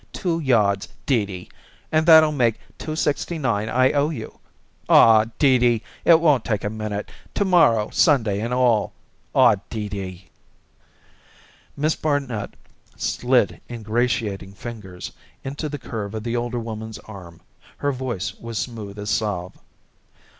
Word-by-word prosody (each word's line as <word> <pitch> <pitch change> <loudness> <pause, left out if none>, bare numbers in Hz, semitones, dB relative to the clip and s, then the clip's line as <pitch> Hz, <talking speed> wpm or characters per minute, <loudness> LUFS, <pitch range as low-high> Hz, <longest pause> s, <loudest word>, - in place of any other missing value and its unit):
Two 170 -4 -1
yards, 105 -9 +2 0.2
Dee 115 -7 +1
Dee, 90 -2 -9 0.4
and 155 +1 +2
that'll 160 -2 +8
make 120 -6 +1 0.2
two 155 - -4
sixty 155 +2 -1
nine 110 -7 -1
I 130 +1 +3
owe 145 +1 +1
you. 160 - -7 0.5
Aw, 110 -1 +7
Dee 130 -4 +4
Dee, 120 -2 +2 0.2
it 165 -1 +7
won't 150 -8 +3
take 110 -4 -2
a 105 - -2
minute, 110 -2 -5 0.2
to 200 - +1
morrow 145 - +4
Sunday 110 - +2
and 115 +2 -3
all! 125 -4 +2 0.4
Aw, - - +6
Dee 105 -3 -4
Dee!" 95 -2 -7 1.5
Miss 155 +2 +1
Barnet 135 -9 -2 0.4
slid 120 -8 +1
ingratiating 110 -4 -2
fingers 100 -4 -8 0.3
into 140 +3 -4
the 145 - -4
curve 110 -5 -6
of 110 - -4
the 120 0 -2
older 120 0 -2
woman's 110 -1 -6
arm; 90 -6 -11 0.4
her 145 - 0
voice 125 -8 -4
was 115 -1 -7
smooth 105 -4 -5
as 105 +1 -4
salve. 95 -5 -2
115 Hz, 140 wpm, -22 LUFS, 105-135 Hz, 1.5 s, that'll